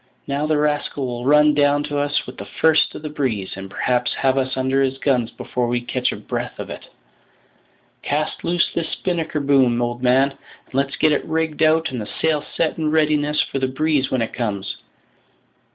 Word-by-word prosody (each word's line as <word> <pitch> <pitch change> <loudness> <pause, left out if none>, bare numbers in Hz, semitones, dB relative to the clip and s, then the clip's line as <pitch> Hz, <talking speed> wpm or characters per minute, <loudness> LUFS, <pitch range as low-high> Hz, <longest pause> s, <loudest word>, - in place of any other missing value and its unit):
Now 140 +2 -1
the 155 -1 +2
rascal 150 -2 0
will 120 -1 -4
run 150 +1 +6
down 145 0 +3
to 145 -1 -2
us 145 0 0
with 125 - -10
the 100 - -7
first 160 -1 +3
of - - -8
the 155 - -4
breeze, 125 -10 -2
and 95 0 -8
perhaps 125 +4 0
have 135 -1 +2
us 130 -1 -1
under 130 +1 +1
his 135 0 0
guns 125 -4 +1
before 125 0 -3
we 120 0 0
can - - -16 0.2
catch - - +2
a - - -4
breath - - -5
of - - -6
it. - - -9 1.1
Cast 150 +1 -2
loose 170 0 +1
this 165 -1 -2
spinnaker 165 -4 -2
boom, 135 -4 +3
old 120 0 -2
man, 130 +2 +4 0.3
and - - -25
let's 135 +1 0
get 155 - +3
it 150 - +1
rigged 160 -1 -2
out 160 0 +3
and 125 -3 -3
the 105 - -7
sail 160 -2 +2
set 165 0 0
in 155 -1 +1
readiness 150 -1 +2
for 135 - -4
the 130 - +1
breeze 140 0 0
when 130 -3 +1
it 115 - -5
comes. 105 -5 -3
140 Hz, 205 wpm, -21 LUFS, 125-150 Hz, 1.1 s, run